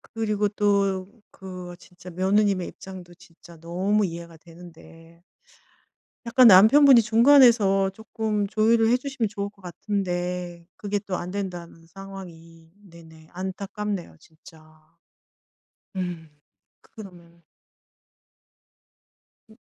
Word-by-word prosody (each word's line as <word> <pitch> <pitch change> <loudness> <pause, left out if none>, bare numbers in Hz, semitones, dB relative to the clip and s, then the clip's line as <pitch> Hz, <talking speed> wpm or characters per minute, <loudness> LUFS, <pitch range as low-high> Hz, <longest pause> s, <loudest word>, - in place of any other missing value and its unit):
그리고 210 -2 -2
또 200 -2 0 0.2
그 180 -2 -9
진짜 180 0 -14
며느님의 190 +1 0
입장도 185 -2 -12
진짜 170 -1 -18
너무 190 +5 -1
이해가 170 -1 -9
되는데 165 0 -17 1.0
약간 250 +1 +6
남편분이 235 +6 +7
중간에서 225 -4 +4
쪼끔 220 -1 -3
조율을 225 +2 +2
해 245 - +3
주시면 255 -3 -3
좋을 200 -1 -5
것 200 -1 -25
같은데 180 -2 -4
그게 205 0 -3
또 195 -2 -5
안 180 0 -6
된다는 175 -4 -7
상황이 165 -3 -13
네네 165 -4 -17
안타깝네요, 190 - -6
진짜. 160 0 -19 1.3
음 175 -4 -5 0.5
그러면 175 -5 -15 2.1
예. 220 - -18
190 Hz, 225 characters per minute, -24 LUFS, 170-210 Hz, 2.1 s, 남편분이